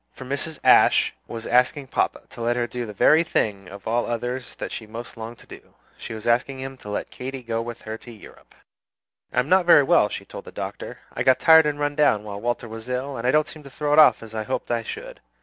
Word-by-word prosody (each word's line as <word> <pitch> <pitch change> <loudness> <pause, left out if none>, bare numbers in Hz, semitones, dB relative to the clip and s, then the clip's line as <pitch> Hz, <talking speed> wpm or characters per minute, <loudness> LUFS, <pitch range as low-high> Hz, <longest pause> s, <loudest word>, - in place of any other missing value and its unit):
For 130 - -10
Mrs. 140 +4 -3
Ashe - - +5
was 115 -1 -7
asking 125 +2 +2
papa - - 0
to - - -10
let 120 +1 +1
her 120 -1 0
do 120 -1 -5
the - - -6
very 155 - +5
thing 100 - -1
of 100 +3 -10
all 120 +2 0
others 125 +2 -4
that - - -6
she 110 - -6
most 115 +2 -8
longed 115 +1 -8
to - - -17
do; - - -14 0.2
she 115 - -7
was 110 - -9
asking 125 +3 +1
him 135 0 -6
to 105 - -11
let 105 - -4
Katy 130 0 -7
go 115 -1 -2
with 120 0 -7
her 110 0 -6
to 120 - -12
Europe! 110 - -16 0.8
"I - - -9
am 125 - 0
not 185 +1 +3
very 145 -4 +8
well," 105 -5 +4
she - - -6
told - - -10
the - - -10
Doctor. - - -6 0.2
"I - - -4
got 130 - +5
tired 160 -1 +7
and 145 -1 -1
run 145 0 0
down 145 -8 +3
while 100 -1 -7
Walter 120 0 -2
was 115 +2 -9
ill, 130 +2 -3
and 115 0 -3
I - - +4
don't 150 +1 +3
seem 155 - -10
to 140 - -12
throw 145 +2 -2
it 150 - +6
off 155 - +6
as 110 -1 -11
I 110 - -2
hoped 125 +2 -3
I 120 -1 +1
should. - - -8
125 Hz, 255 wpm, -24 LUFS, 115-140 Hz, 0.8 s, very